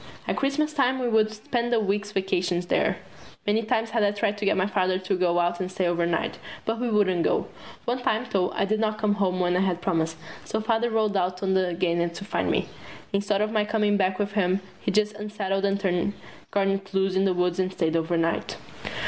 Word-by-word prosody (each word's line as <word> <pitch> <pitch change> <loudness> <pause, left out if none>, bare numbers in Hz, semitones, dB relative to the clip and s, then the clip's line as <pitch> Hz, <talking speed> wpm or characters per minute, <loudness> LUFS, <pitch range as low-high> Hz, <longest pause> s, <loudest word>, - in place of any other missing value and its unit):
At - - 0
Christmas 300 +3 0
time 260 -3 +2
we 255 -1 -1
would 220 -2 +3
spend 235 +2 -2
the 235 - +4
week's 205 0 -1
vacation 185 -3 0
there. 175 - +1 0.5
Many 210 +2 +2
times 225 0 0
had 230 - +1
I 205 - +4
tried 205 0 0
to 205 - -2
get 200 - +3
my 185 - +2
Father 185 -2 +1
to 185 +1 -1
go 180 -1 +2
out 175 0 +1
and 185 -1 -3
stay 185 0 -1
overnight. 175 +6 0 0.3
But 225 +1 -1
he 245 +1 -1
wouldn't 195 -5 +2
go. - - +1 0.4
One 245 +1 -1
time, 220 0 0
though, 185 -2 +2
I - - +1
did 215 +2 0
not 215 -1 0
come 215 -1 +2
home 190 -3 0
when 180 0 +2
I - - +3
had 185 -2 +1
promised, 165 -3 0 0.3
so 220 - -2
Father 225 +2 +1
rode 215 -2 +1
out 185 0 0
on 190 0 +2 0.2
Garnett 170 -1 0
to 195 - -7
find - - -1
me. - - +1 0.5
Instead 200 0 +1
of 215 0 0
my 215 -1 +2
coming 210 -1 +1
back 190 -2 +1
with 205 -1 -1
him 195 -1 +1 0.2
he - - -2
just 210 0 +2
unsaddled 205 -2 -2
and 200 0 +1
turned 190 0 0 0.4
Garnett 195 -1 0
loose 190 0 +2
in 190 +1 +3
the 185 -2 +2
woods 180 0 +1
and 185 0 +1
stayed 165 -3 0
overnight. 165 0 0
200 Hz, 220 wpm, -26 LUFS, 185-215 Hz, 0.5 s, the